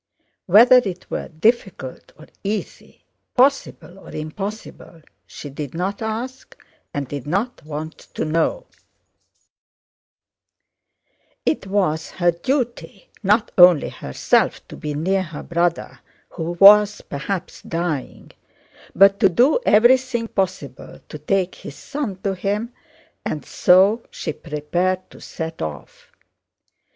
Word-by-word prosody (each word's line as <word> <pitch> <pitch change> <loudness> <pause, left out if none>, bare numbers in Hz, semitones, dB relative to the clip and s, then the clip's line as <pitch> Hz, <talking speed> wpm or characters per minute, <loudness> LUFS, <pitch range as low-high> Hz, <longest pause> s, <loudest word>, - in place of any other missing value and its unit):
Whether 230 +7 +7
it 190 -7 -2
were - - -3
difficult 180 - -1
or 155 - -14 0.2
easy, 205 +1 -6 0.3
possible 255 -8 +1
or - - -14
impossible, 170 +1 -7 0.2
she 145 - -9
did 145 +1 -7
not 190 +5 -3
ask 235 +4 -5 0.3
and 140 -2 -4
did 145 +1 -7
not 200 +10 -2
want 155 +1 -7 0.2
to - - -2
know: 165 - 0 2.8
it 245 - -1
was 180 -6 0
her 175 -1 +1
duty, 235 - -3
not 210 +2 +2
only 175 -4 +7
to - - -14
herself, 65 - 0
to - - -9
be 150 -1 -5
near 190 +6 0
her 165 -5 -7
brother 170 0 -1 0.3
who 165 +1 -4
was 205 +3 +7
perhaps 180 +6 -5
dying, 165 -5 -4 0.6
but 195 +1 +6
to 200 -4 +5
do 250 - +3
everything 240 +2 +4
possible 190 -3 -4
to - - -8
take 190 -2 0
his 140 - -10
son 275 -9 -5
to 195 - 0
him, 205 +5 -3 0.5
and 150 - -4
so 195 +5 +4
she 155 - -5
prepared 175 +5 -2
to - - -15
set 160 -1 -6
off. 75 -2 -8
185 Hz, 120 wpm, -21 LUFS, 160-215 Hz, 2.8 s, Whether